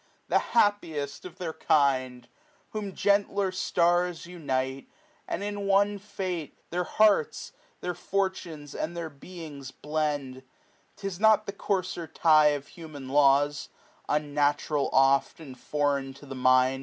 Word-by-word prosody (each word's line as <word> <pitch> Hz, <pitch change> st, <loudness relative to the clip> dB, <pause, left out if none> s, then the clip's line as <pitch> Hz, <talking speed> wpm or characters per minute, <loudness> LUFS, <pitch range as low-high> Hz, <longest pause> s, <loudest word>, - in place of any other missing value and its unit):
the -, -, +4 dB, 0.2 s
happiest 160 Hz, -11 st, +1 dB
of 180 Hz, -, -10 dB
their 170 Hz, -3 st, -4 dB
kind! 130 Hz, -6 st, +1 dB, 0.5 s
mo 215 Hz, -, -2 dB
Whom 195 Hz, -2 st, -6 dB
gentler 200 Hz, -1 st, +2 dB
itars 175 Hz, -1 st, +1 dB
unite, 135 Hz, -6 st, -3 dB, 0.4 s
ind -, -, -2 dB
in 205 Hz, -1 st, -3 dB
one 200 Hz, +1 st, +3 dB
fate, 185 Hz, -6 st, -5 dB
Their 180 Hz, +1 st, -1 dB
hearts, 210 Hz, -7 st, +2 dB, 0.3 s
their 180 Hz, -, -2 dB
fortunes^ 175 Hz, -5 st, -3 dB
and 170 Hz, +2 st, -4 dB
their 165 Hz, -2 st, -4 dB
beings 145 Hz, -2 st, -9 dB
blend, 145 Hz, -3 st, -3 dB, 0.5 s
*Tis 195 Hz, -3 st, -5 dB
not 220 Hz, -1 st, +5 dB
the 200 Hz, -, -5 dB
coarser 185 Hz, -4 st, -2 dB
tie 155 Hz, -1 st, +5 dB
of 145 Hz, -1 st, -1 dB
huhian 150 Hz, -6 st, -9 dB
laws, 145 Hz, 0 st, +3 dB, 0.4 s
Unnatural 145 Hz, 0 st, +1 dB
oft, 135 Hz, +3 st, +3 dB
and 140 Hz, -5 st, -10 dB
foreign 140 Hz, 0 st, -1 dB
to 140 Hz, -, -14 dB
the 135 Hz, -, -7 dB
mind. 130 Hz, 0 st, +3 dB
155 Hz, 130 wpm, -27 LUFS, 140-185 Hz, 0.5 s, not